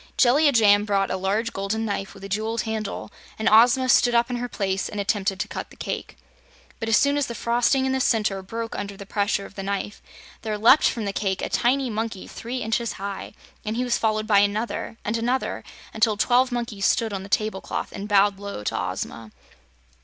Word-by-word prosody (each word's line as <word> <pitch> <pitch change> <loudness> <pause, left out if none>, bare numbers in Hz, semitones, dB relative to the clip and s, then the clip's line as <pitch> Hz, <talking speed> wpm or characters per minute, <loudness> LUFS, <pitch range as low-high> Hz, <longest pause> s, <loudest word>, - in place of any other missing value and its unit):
Jellia 285 +4 +5
Jamb 205 -4 +5
brought 200 -2 +1
a - - 0
large 200 +5 -1
golden 200 +3 -2
knife 200 -2 -4
with 195 - -13
a - - -5
jeweled 215 +3 -1
handle, 220 -2 -4 0.3
and 220 - -1
Ozma 245 +4 +6
stood 240 -1 +4
up 235 +1 +3
in 245 - -1
her 245 0 -4
place 195 -3 -2
and 210 - -5
attempted 200 -1 0
to - - -2
cut - - -6
the - - -16
cake. - - -5 0.6
But 225 -2 -3
as 220 - +5
soon 280 +1 +3
as 285 - 0
the 235 - -6
frosting 240 +4 +2
in 265 - 0
the 265 - 0
center 210 -6 +1
broke 225 +4 -5
under 200 -1 -5
the 200 - -9
pressure 200 0 -1
of - - -12
the 195 - -6
knife 200 +1 -4 0.4
there 215 -2 -3
leaped 235 +8 +6
from 225 -3 -4
the 200 - -2
cake 195 -2 -1
a - - -2
tiny 255 +1 +1
monkey 220 -2 -3
three 250 +2 -5
inches 225 +1 -1
high, 200 0 -6 0.3
and 215 +1 -3
he 250 - +1
was 245 -1 0
followed 215 -1 0
by 205 -2 +5
another 210 +2 -1
and 215 +2 0
another, 245 +3 -1 0.3
until 220 -1 +2
twelve 250 +3 +3
monkeys 235 -5 -1
stood 225 -2 +1
on 195 - -3
the 195 - -10
tablecloth 215 -2 -2
and 200 +1 -6
bowed 200 -1 +4
low 200 - -6
to - - -2
Ozma. 100 +4 -4
215 Hz, 215 wpm, -24 LUFS, 200-235 Hz, 0.6 s, Ozma